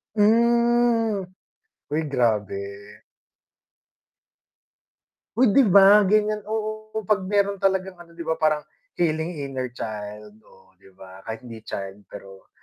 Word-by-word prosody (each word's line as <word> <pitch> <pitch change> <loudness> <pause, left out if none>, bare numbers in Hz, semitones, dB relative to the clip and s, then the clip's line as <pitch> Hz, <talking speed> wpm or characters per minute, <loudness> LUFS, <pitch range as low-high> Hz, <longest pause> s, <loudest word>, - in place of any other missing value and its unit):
Hmm. 235 -1 +3 0.7
Hoy, 155 +1 -1
grabe. 105 -5 -2 2.3
Uy, 240 -3 +4
'di 275 - +5
ba, 200 +2 +7
gan'yan, 210 0 +1
oo, 215 0 -4
'pag 205 0 +1
meron 200 -1 +1
talagang 190 -1 0
ano, 170 -1 -15
'di 170 - -7
ba, 160 0 -2
parang 155 -1 +1 0.3
heading 160 0 -1
inner 130 -2 -4
child. 105 -1 -7
Oh 95 - -22
di 95 - -20
ba, 95 0 -14
kahit 110 0 -6
hindi 115 -2 -9
child 100 +1 -7
pero 95 -1 -13
170 Hz, 120 wpm, -23 LUFS, -, 2.3 s, ba